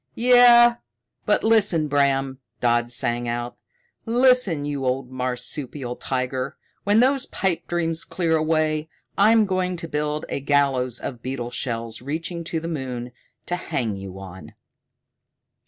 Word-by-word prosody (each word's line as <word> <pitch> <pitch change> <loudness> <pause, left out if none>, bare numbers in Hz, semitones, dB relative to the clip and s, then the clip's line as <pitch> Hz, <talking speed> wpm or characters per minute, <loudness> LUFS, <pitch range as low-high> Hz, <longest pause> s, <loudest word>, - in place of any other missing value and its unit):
"Yeah, 240 0 +7 0.5
but - - +2
listen, 200 -8 +3
Bram," 135 -2 +1 0.2
Dodd 120 0 +1
sang 120 0 -2
out. 120 +1 -4 0.5
"Listen, 240 - +3
you 145 -2 -3
old 130 0 -2
marsupial 125 +1 -4
tiger. 130 +2 -3 0.3
When 205 +3 +4
those 270 +1 +2
pipe 190 -4 -2
dreams 165 -1 -1
clear 165 -3 0
away, 155 0 0 0.3
I'm 215 +2 +5
going 185 -2 -1
to 165 - -4
build 150 0 -2
a - - -3
gallows 135 -3 +1
of 120 -3 -6
beetle 125 -2 -4
shells 115 -2 -4
reaching 165 +5 -4
to 165 0 -2
the 165 - -6
moon, 130 -6 -5 0.3
to 175 - -2
hang 120 - -3
you 95 -1 -8
on!" 95 -1 -11
145 Hz, 135 wpm, -23 LUFS, 125-175 Hz, 0.5 s, Yeah